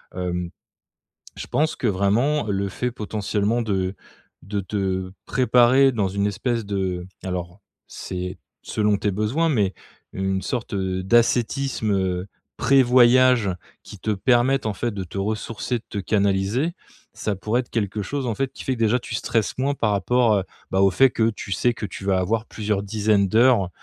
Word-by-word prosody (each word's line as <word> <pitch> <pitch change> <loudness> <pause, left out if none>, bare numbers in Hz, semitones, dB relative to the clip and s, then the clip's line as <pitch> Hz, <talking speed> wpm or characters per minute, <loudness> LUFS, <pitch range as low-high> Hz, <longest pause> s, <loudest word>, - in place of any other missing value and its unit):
hem, 90 -1 -3 0.9
je - - -6
pense 155 +1 0
que 120 - -1
vraiment, 110 +10 +2
le 100 0 -1
fait 125 +5 -3
potentiellement, 105 +1 -1
de 95 -3 -1 0.5
de 100 +2 -3
te 95 -2 -2
préparer 125 +2 +4
dans 105 -4 0
une 100 +1 0
espèce 115 +3 -2
de 95 -3 -2 0.2
alors 90 +1 -5 0.3
c'est, 90 0 -6 0.3
selon 105 -2 +1
tes 105 0 -1
besoins 110 - 0
mais 105 -9 +1 0.4
une 95 0 -1
sorte, 120 -3 -4
heu, 95 -1 -2
d'ascétisme, 120 +2 +1
heu, 95 -1 -1 0.3
pré-voyage 125 -3 +5 0.3
qui - - -11
te 110 - -1
permette, 120 +6 +2
en 105 - -1
fait, 120 +4 -2
de 100 -2 -4
te 90 - -9
ressourcer, 110 +4 -2
de - - -23
te 105 - -5
canaliser. 100 - +1 0.4
Ça 105 -2 -2
pourrait 110 +6 0
être 120 - -15
quelque 105 -2 -1
chose, 140 +7 -3
en 115 - -1
fait, 135 -1 -2
qui - - -9
fait 130 - +1
que - - -11
déjà 115 +2 +3
tu - - -6
stresses 115 -3 -1
moins 140 +2 +1
par 110 -5 0
rapport, 115 +4 +2
heu, 95 - -1 0.3
bah, 95 - +2
au 95 0 +5
fait 130 +8 +5
que 110 0 +2
tu 100 - -8
sais 120 +5 +1
que 110 - -5
tu 95 - -9
vas 95 -1 +2
avoir 110 +4 0
plusieurs 105 -3 -2
dizaines 105 -1 +1
d'heures, 115 -3 +4
105 Hz, 175 wpm, -23 LUFS, 95-120 Hz, 0.9 s, pré-voyage